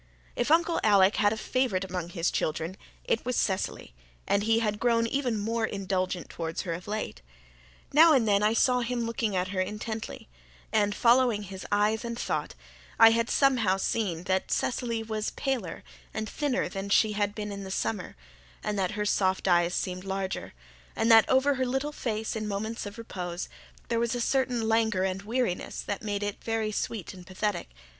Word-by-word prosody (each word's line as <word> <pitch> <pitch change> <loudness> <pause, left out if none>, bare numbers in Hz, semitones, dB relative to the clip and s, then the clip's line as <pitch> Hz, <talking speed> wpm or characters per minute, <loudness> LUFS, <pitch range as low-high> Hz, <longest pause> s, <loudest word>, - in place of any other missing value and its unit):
If 240 - 0
Uncle 335 +1 +3
Alec 200 -2 +5
had 205 -1 +4
a 220 - -2
favourite 220 -5 0
among 180 -2 -4
his 170 -1 -1
children 160 +3 -2 0.3
it 225 - 0
was 250 0 -1
Cecily, 190 - -1 0.3
and 200 - +2
he 225 +2 +3
had 210 -2 0
grown 230 -1 +3
even 245 -2 0
more 225 +2 -1
indulgent 190 -3 -2
towards 165 -1 -4
her 170 - -2
of 175 +3 -7
late. 210 - -4 0.7
Now 320 +2 +8
and 245 -6 +3
then 200 -1 +4
I 210 +1 +3
saw 250 +2 +4
him 245 0 -1
looking 230 -3 -1
at 185 0 0
her 190 -1 -1
intently, 215 +3 -5 0.5
and, 205 -1 +2
following 240 -3 +4
his 190 -1 -8
eyes 210 +2 +2
and 235 0 -4
thought, - - -2 0.4
I 225 0 +9
had, 230 +1 +1
somehow, 240 -9 +3
seen 190 -4 -1
that 190 0 0
Cecily 235 -2 -1
was 215 -1 -2
paler 250 -10 -3 0.3
and 220 0 -2
thinner 285 0 -1
than 195 0 -5
she 215 +2 +4
had 205 0 -1
been 210 -1 -4
in 200 0 -6
the 190 - -7
summer, 190 0 -2 0.5
and 210 -1 -1
that 185 0 0
her 210 - 0
soft 190 -2 +1
eyes 175 -1 +3
seemed 185 0 -2
larger, 195 0 -4 0.4
and 225 +1 +2
that 225 -1 +7
over 265 +2 +4
her 260 -1 0
little 270 +4 -1
face 220 -6 -3
in 215 -1 -3
moments 210 +2 -3
of 205 +3 -9
repose 180 -6 -5 0.4
there 230 - +1
was 235 +1 0
a - - -2
certain 245 -2 +1
languor 220 -4 +2
and 190 0 -1
weariness 230 -2 -2
that 200 - -4
made 205 -1 -2
it 205 -1 -4
very 225 -1 -1
sweet 210 -1 -3
and 180 -1 -13
pathetic. 190 - -2
215 Hz, 185 wpm, -28 LUFS, 190-230 Hz, 0.7 s, I